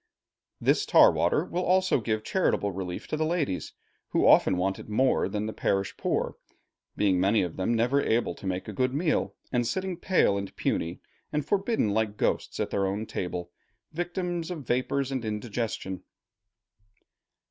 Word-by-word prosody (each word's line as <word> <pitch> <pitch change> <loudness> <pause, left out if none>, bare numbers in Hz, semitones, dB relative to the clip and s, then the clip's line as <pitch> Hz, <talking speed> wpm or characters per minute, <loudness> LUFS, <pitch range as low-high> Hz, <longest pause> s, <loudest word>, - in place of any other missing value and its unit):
This - - +2
tar - - +7
water - - +1
will 175 - -2
also 185 -6 +2
give 110 0 -1
charitable 110 - +1
relief 90 -1 -5
to - - -1
the 155 - 0
ladies, 155 - -1 0.4
who - - +2
often 95 - +6
want 95 +2 0
it - - -10
more 130 +5 +2
than 105 0 -2
the 110 - -4
parish 95 0 -1
poor; - - -1 0.6
being 95 -3 +3
many 100 +3 +3
of 85 -2 -4
them 95 +5 0
never 125 +5 +2
able 115 -2 +1
to 100 - -8
make 90 0 -3
a 105 - -5
good 130 +5 0
meal, 155 +1 0 0.2
and 120 -2 +1
sitting 190 +3 -2
pale 170 - +2
and 100 - -7
puny, 85 +2 -2 0.3
and 150 -2 -1
forbidden 200 - +1
like 105 -1 0
ghosts, - - -1
at - - -1
their 100 -1 +1
own 100 +3 -2
table, 90 -3 -4 0.4
victims 175 0 -3
of 160 -7 -6
vapors 130 +3 0
and 130 -3 -2
indigestion. 105 -3 -3
115 Hz, 170 wpm, -28 LUFS, 100-155 Hz, 0.6 s, tar